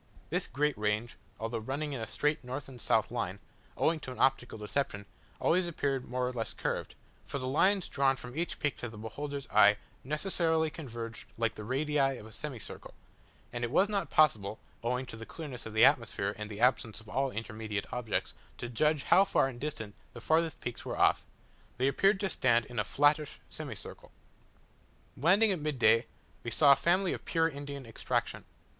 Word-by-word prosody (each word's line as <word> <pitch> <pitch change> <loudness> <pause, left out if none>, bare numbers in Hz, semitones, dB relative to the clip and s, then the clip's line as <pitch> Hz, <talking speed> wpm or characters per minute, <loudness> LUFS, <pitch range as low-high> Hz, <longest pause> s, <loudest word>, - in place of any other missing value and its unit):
This - - +1
great 150 +1 0
range, 105 +3 0 0.2
although 115 +1 -2
running 140 +6 -3
in 125 - -4
a 110 - -4
straight 150 +6 0
north 130 +3 -5
and 125 -3 -11
south - - +2
line, - - -2 0.4
owing 160 0 +2
to 130 - -7
an 125 - -8
optical 130 -3 +2
deception, 105 -1 -2 0.3
always 180 +1 +3
appeared 140 -6 -2
more 125 0 0
or 125 - -3
less 115 -3 -3
curved; - - -3 0.3
for - - -3
the 130 - -4
lines 185 +8 +3
drawn 135 -1 +2
from 125 0 -9
each 170 +2 -2
peak 150 -2 -1
to 120 - -5
the 110 - -11
beholder's 140 +6 -5
eye, 105 0 +7 0.3
necessarily 160 +1 +1
converged 120 -7 -7
like 115 -1 +1
the 105 - -8
radii 135 +2 +1
of 105 - -10
a 110 - -12
semicircle, 130 -3 -7 0.6
and 120 0 -3
as - - +2
it - - -10
was 195 +8 +4
not 200 -7 -1
possible 110 -9 +3 0.3
(owing 125 +2 0
to 120 - -9
the 115 - -8
clearness 130 -3 -7
of 110 - -8
the 110 - +8
atmosphere 115 -7 +2
and 105 0 -6
the 105 -1 -7
absence 115 -4 +2
of 110 - -16
all 135 +4 0
intermediate 110 -3 -4
objects) 120 -4 -2 0.2
to 120 - -5
judge 150 +5 +2
how 195 - +6
far 135 -8 +2
distant 120 -5 -5 0.2
the 120 - -8
farthest 160 +5 +1
peaks 120 - -5
were - - -4
off, - - +3 0.5
they 130 +2 +2
appeared 195 +8 +3
to 195 - 0
stand 120 -9 +2
in 120 0 -5
a - - +2
flattish 145 +6 +2
semicircle. - - -8 1.0
Landing 195 - +5
at 185 - 0
midday, 125 -6 +3 0.4
we 120 - -3
saw 140 +5 +6
a - - +9
family 180 +6 +2
of - - -6
pure 165 -1 +2
Indian 140 -3 -6
extraction. 115 - -2
130 Hz, 190 wpm, -31 LUFS, 115-150 Hz, 1.0 s, a